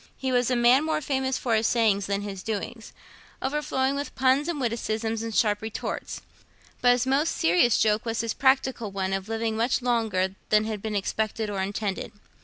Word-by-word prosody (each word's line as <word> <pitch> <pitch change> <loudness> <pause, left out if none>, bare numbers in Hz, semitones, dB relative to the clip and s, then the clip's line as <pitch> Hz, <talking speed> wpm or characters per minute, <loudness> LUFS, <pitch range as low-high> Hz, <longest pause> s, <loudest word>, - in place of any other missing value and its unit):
He 265 -1 -2
was 245 -1 +2
a 250 - +2
man 245 +4 +5
more 315 0 0
famous 265 -2 -1
for 240 - -1
his 220 0 +3
sayings 210 -4 +2
than 200 0 -1
his 195 -2 -6
doings, 220 +2 -5 0.5
overflowing 270 -1 0
with 285 +1 -4
puns 265 +4 +2
and 340 -4 -2
witticisms 225 -2 -2
and 230 0 -4
sharp 210 -2 +2
retorts; 220 0 -5 0.6
but 245 0 +6
his 245 0 0
most 280 +5 +1
serious 180 +8 +4
joke 215 0 +2
was 230 -1 -1
his 230 -1 -2
practical 265 -4 +1
one 195 -1 -2
of 195 +2 -3
living 225 0 -1
much 235 +3 +1
longer 220 -6 +1 0.2
than 215 0 +4
had 215 -2 -4
been 215 0 -3
expected 215 +2 -2
or 195 -2 -2
intended. 200 0 -3
225 Hz, 190 wpm, -26 LUFS, 210-260 Hz, 0.6 s, but